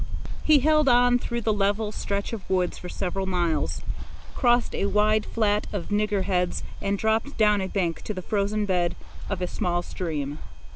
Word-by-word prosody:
He 300 -3 +5
held 305 0 +4
on 245 0 +5
through 235 0 -3
the 220 -1 +1
level 205 +1 0
stretch 200 +1 -3
of 215 -4 -7
woods 185 -2 +1
for 180 - -8
several 190 +1 -3
miles, 175 -3 0 0.5
crossed 240 -2 +2
a 200 - 0
wide 210 +1 +2
flat 210 -2 +1
of 200 -5 -4
nigger 205 -1 +1
heads, 180 -2 0 0.2
and 200 0 0
dropped 220 +7 0
down 210 -2 +4
a 190 - -2
bank 175 -4 -1
to 215 - -3
the 185 - -5
frozen 210 +1 0
bed 180 -3 +1 0.3
of 185 -2 -2
a - - 0
small 175 0 -1
stream. 150 -6 -4
205 Hz, 180 wpm, -25 LUFS, 185-220 Hz, 0.5 s, He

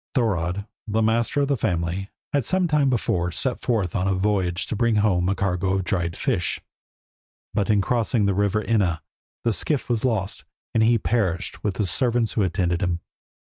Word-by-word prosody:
Thorodd, 100 -5 0 0.2
the 110 +1 +1
master 115 +5 +2
of 140 - +2
the 140 - +2
family, 90 -2 -1 0.2
had 140 -2 +2
some 185 +7 +1
time 150 -4 +3
before 90 -8 0
set 125 +7 -1
forth 105 -8 -1
on 95 -1 +1
a 95 - +2
voyage 95 -2 0
to - - -3
bring 115 +1 +2
home 95 -4 +2
a 100 - +1
cargo 95 0 0
of 95 - 0
dried 85 -2 -1
fish; - - 0 0.9
but 100 - 0
in 105 -2 +4
crossing 115 -1 +1
the 100 - +2
river 100 +2 +1
Enna 95 -8 +1 0.4
the 115 - +2
skiff 140 +2 -1
was 115 -2 0
lost 110 -7 -1 0.3
and 110 - +3
he 115 +1 +5
perished 100 -5 -1
with 105 -3 -1
the 105 - 0
servants 120 +4 +2
who 110 - +1
attended 90 -1 0
him. 90 -3 0
105 Hz, 185 wpm, -24 LUFS, 90-115 Hz, 0.9 s, he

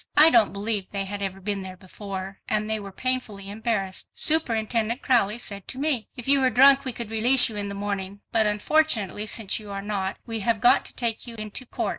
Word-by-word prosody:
I 310 +2 +9
don't 225 -4 +4
believe 200 -1 -2
they 195 -1 -2
had 200 +1 -6
ever 195 -1 -4
been 200 0 -2
there 185 -1 -8
before, 195 0 -8
and 215 0 0
they 220 0 -1
were 200 -1 -9
painfully 210 -4 -3
embarrassed. 205 -3 -3
Superintendent 235 -5 0
Crowley 230 -5 +2
said 200 -5 -6
to - - -6
me, 275 -5 0
"If 245 -1 -9
you 275 0 +5
were 260 - +3
drunk 275 +3 +6
we 260 - -1
could 230 -2 -6
release 245 +4 +5
you 220 - -8
in 205 -1 -3
the 200 - -5
morning, 200 0 -5
but 220 -2 +3
unfortunately 210 - +1
since 215 -1 0
you 210 -1 -11
are 195 0 -5
not 200 -2 -3
we 225 -2 -3
have 220 +1 0
got 240 - +4
to - - -11
take 235 -1 -1
you 235 - -7
into 215 +3 -6
court." - - -3
215 Hz, 220 wpm, -24 LUFS, 200-240 Hz, -, I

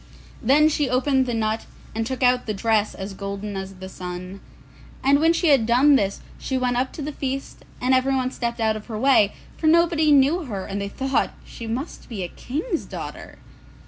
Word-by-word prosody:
Then 285 +6 +5
she 295 -3 +1
opened 260 +1 +2
the 240 - -1
nut, 220 0 -1 0.3
and 225 0 -2
took 260 0 -3
out 250 -1 +3
the 215 - -1
dress 215 0 +1
as 195 +1 -6
golden 200 +1 -5
as 190 0 -6
the 190 0 -8
sun. 180 +1 -7 0.6
And 280 +2 +5
when 325 +2 +4
she 335 0 +2
had 265 -6 +4
done 265 +5 +5
this, 200 -6 0 0.2
she 265 - -2
went 250 -1 0
up 255 +2 0
to 300 - -6
the 300 - -3
feast, 275 -1 -5 0.2
and 255 +1 +2
everyone 260 0 +2
stepped 235 -2 -3
out 220 -1 +2
of 215 - -8
her 220 -3 -5
way, 225 -4 +4 0.2
for 315 - 0
nobody 325 -1 +4
knew 290 +5 +4
her, 200 -7 -5
and 200 0 -4
they 200 - -3
thought 265 +5 -1
she 230 - -8
must 255 +8 -5
be 210 -6 -4
a - - -3
King's 320 - -3
daughter. - - -8
250 Hz, 205 wpm, -23 LUFS, 210-275 Hz, 0.6 s, Then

